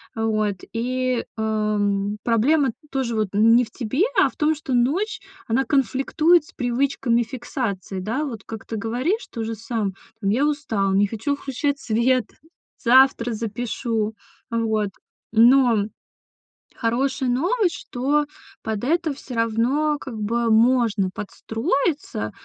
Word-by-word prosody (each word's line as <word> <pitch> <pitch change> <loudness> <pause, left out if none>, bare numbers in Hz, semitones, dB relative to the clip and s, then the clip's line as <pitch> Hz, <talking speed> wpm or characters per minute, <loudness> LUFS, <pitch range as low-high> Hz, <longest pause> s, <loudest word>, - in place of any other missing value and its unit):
вот. 215 -2 0 0.2
И, 255 +1 -1
ам, 210 -2 0
проблема 260 +5 +3 0.2
тоже 260 -4 -1
вот 215 -1 +1
н 225 +2 +6
не 245 +1 +4
в 225 - -18
тебе, 260 - -1
а - - +5
в - - -20
том, 310 +1 +2
что 275 -3 -5
ночь- 300 - +1 0.3
она 255 +4 +1
конфликтует 290 +5 +2
с - - -18
привычками 245 -1 +1
фиксации, 225 - -4
да, 225 +10 -2
вот 230 -9 -5
как 225 -1 -8
ты 225 - -4
говоришь 250 - -1
тоже 225 -1 -4
сам: 220 -3 -3 0.3
"Там 195 - 0
я 250 +8 +2
устал, 225 -10 0
не 200 +1 +3
хочу 225 +7 -2
включать 280 +1 -2
свет, 245 0 +1 0.5
завтра 250 -1 +4
запишу", 225 0 -2 0.3
вот. 220 -3 0 0.4
Но 235 -2 +5 0.9
хорошая 260 +3 0
новость, 350 - +1
что 285 +4 0 0.4
под 220 +1 -3
это 325 +1 +1
всё 270 -2 -10
равно 240 +7 +1
как 260 -5 -7
бы 230 +2 0
можно 225 -3 +3
подстроиться, 225 - -2
235 Hz, 130 wpm, -23 LUFS, 220-270 Hz, 0.9 s, н